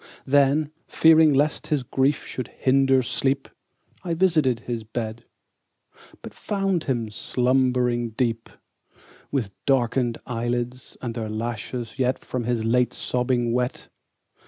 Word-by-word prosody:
Then, 145 +2 +3 0.2
fearing 160 -1 +6
lest 145 +2 +1
his 145 -4 0
grief 135 +3 0
should 130 - -5
hinder 135 0 +2
sleep, 135 +2 -1 0.6
I 170 -3 -2
visited 155 -9 +2
his 115 -2 -4
bed, 110 +1 -5 1.0
But - - -8
found 195 -4 -1
him 120 -5 -1
slumbering 125 0 +1
deep, 115 0 -2 0.8
With 125 -8 -1 0.2
darken'd 125 -2 +2
eyelids, 120 +1 -3
and 120 -2 -3
their 115 -2 -4
lashes 115 +2 -4
yet 130 0 +1
10 - - -23
From 125 -1 -2
his 120 -2 -1
late 125 +1 +2
sobbing 125 -1 0
wet. 125 0 -2
125 Hz, 125 wpm, -24 LUFS, 120-135 Hz, 1.0 s, fearing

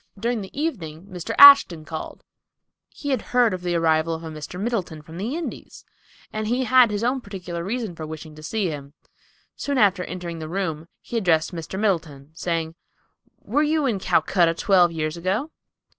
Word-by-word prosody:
During 235 +1 -1
the 195 +8 -8
evening 180 - -4
Mr. 180 -2 -5
Ashton 280 - +9
called. 160 -1 -7 0.7
He 285 - -7
had 260 -5 +1
heard 245 -4 +2
of 185 - -4
the 175 -1 -1
arrival 165 0 +2
of 160 - -9
a 160 - -6
Mr. 155 +3 -8
Middleton 195 -8 -3
from 160 +3 -10
the 230 +9 -3
Indies, 340 - -7 0.5
and 215 0 -3
he 245 +3 +1
had 255 -2 +5
his 210 +1 -2
own 255 +2 0
particular 180 -5 -6
reason 215 -2 -3
for 155 -1 -7
wishing 155 0 -8
to 155 - -13
see 200 +5 -1
him. 140 -1 -8 0.6
Soon 280 -1 -2
after 200 -5 +3
entering 175 -2 -6
the 155 0 -6
room, 165 -4 -3 0.2
he 235 - -4
addressed 175 -5 +1
Mr. 170 +3 -5
Middleton, 160 -9 -1
saying, 165 -1 -2 0.7
"Were 265 +8 +1
you 305 0 +1
in 225 -7 0
Calcutta 170 -1 +2
twelve 180 -2 +4
years 155 0 -3
ago?" 195 - -2
180 Hz, 180 wpm, -23 LUFS, 160-225 Hz, 0.7 s, Ashton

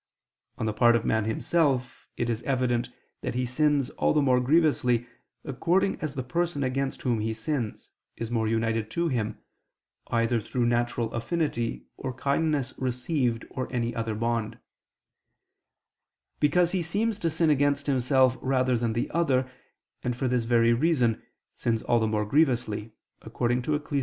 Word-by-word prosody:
On - - -2
the 110 - 0
part 120 +2 +5
of 115 - 0
man 110 -1 +1
himself, 130 +2 0
it 120 - -1
is 115 -1 -2
evident 125 -3 0 0.3
that - - -3
he 125 0 0
sins 140 +1 +1
all - - +1
the 150 - +4
more 130 -2 +4
grievously, 125 -4 +2 0.4
according 180 +9 0
as 150 -2 -3
the 130 - -2
person 165 +2 -1
against 135 +1 -2
whom 120 -4 +1
he 110 +1 -2
sins, 125 -6 -4 0.2
is 115 0 -5
more 110 -2 +1
united 115 0 0
to 170 +6 0
him, 115 -6 -2 0.7
either 115 0 +1
through 120 +3 -1
natural 120 -1 0
affinity 120 -2 -2
or 130 -1 -4
kindness 140 -1 0
received 125 -1 -1
or 130 -1 -4
any 120 -2 -1
other 115 -1 -2
bond; 115 0 -1 1.8
because 170 +4 +3
he 185 - 0
seems 205 +6 -1
to 170 - 0
sin 160 0 +2
against 145 0 +2
himself 130 -1 +3
rather 130 -1 +1
than 115 -1 0
the 120 - -1
other, 135 -6 +1 0.6
and, 125 -1 -1
for 130 +2 -1
this 125 -2 0
very 115 0 +4
reason, 125 -4 +2 0.3
sins 115 -2 -1
all 120 -1 +2
the 110 - +1
more 105 -1 0
grievously, 115 -5 +1 0.3
according 120 +2 -1
to 150 +4 0
Ecclus. 145 -1 -2
125 Hz, 160 wpm, -27 LUFS, 115-145 Hz, 1.8 s, part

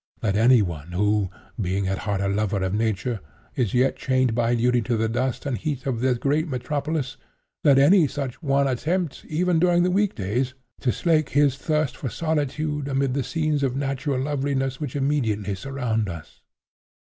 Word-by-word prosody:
Let 100 -3 +1
any 115 +1 +5
one 85 -2 -6
who, 105 +1 +1 0.3
being 95 +1 -1
at 95 0 -1
heart 100 -2 -2
a 100 - 0
lover 100 -1 0
of 95 0 -1
nature, 110 +1 -1 0.4
is 120 -5 0
yet 130 +2 +2
chained 130 -2 +1
by 120 +1 +2
duty 120 +1 +2
to 115 +1 -1
the 110 +1 +1
dust 125 +4 -2
and 140 -3 -1
heat 140 -2 -3
of 130 -4 -1
this 125 0 +2
great 150 +6 +1
metropolis—let 140 +1 -2
any 160 +4 +6
such 135 -1 -5
one 140 -2 +2
attempt, 155 +5 -1
even 170 +2 +1
during 175 0 +4
the 180 - +2
weekdays, 130 - 0 0.2
to 125 - +1
slake 155 -1 +1
his 145 -1 +3
thirst 150 0 -1
for 130 - -4
solitude 150 -1 -1
amid 135 -1 0
the 140 - 0
scenes 155 -2 0
of 130 -2 0
natural 135 -1 -1
loveliness 135 -1 -1
which 145 -4 -5
immediately 115 -8 0
surround 115 -1 -2
us. 80 -3 -9
130 Hz, 170 wpm, -24 LUFS, 110-145 Hz, 0.4 s, any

